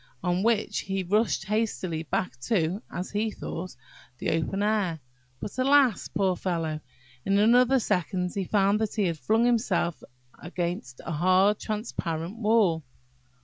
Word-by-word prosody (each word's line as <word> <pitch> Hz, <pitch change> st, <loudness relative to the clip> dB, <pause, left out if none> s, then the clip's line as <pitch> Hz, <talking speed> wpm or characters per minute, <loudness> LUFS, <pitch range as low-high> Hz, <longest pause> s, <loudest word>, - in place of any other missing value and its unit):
on 180 Hz, +1 st, +1 dB
which 225 Hz, 0 st, +1 dB
he 195 Hz, -1 st, -2 dB
rushed 210 Hz, +2 st, +1 dB
hastily 200 Hz, -6 st, -1 dB
back 165 Hz, 0 st, -2 dB
to 180 Hz, -, 0 dB
(as 180 Hz, +1 st, -5 dB
he 215 Hz, +2 st, 0 dB
thought) 185 Hz, -3 st, -6 dB, 0.4 s
the -, -, -1 dB
open 165 Hz, +5 st, -1 dB
air. 205 Hz, -6 st, 0 dB, 0.4 s
But, 210 Hz, -, -6 dB
alas! 265 Hz, -4 st, +4 dB
poor 190 Hz, -2 st, 0 dB
fellow, 165 Hz, -4 st, -2 dB, 0.4 s
in 195 Hz, 0 st, +2 dB
another 245 Hz, +5 st, +5 dB
second 180 Hz, -3 st, -1 dB
he 195 Hz, -2 st, -2 dB
found 200 Hz, +1 st, +2 dB
that 220 Hz, -, -2 dB
he 210 Hz, -, +1 dB
had 165 Hz, -3 st, -1 dB
flung 225 Hz, +6 st, +2 dB
himself 215 Hz, -8 st, +1 dB, 0.4 s
against 170 Hz, -7 st, -4 dB
a -, -, -4 dB
hard 185 Hz, +6 st, +3 dB
transparent 190 Hz, -4 st, -4 dB
wall! 210 Hz, -8 st, +3 dB
195 Hz, 145 wpm, -27 LUFS, 175-215 Hz, 0.4 s, another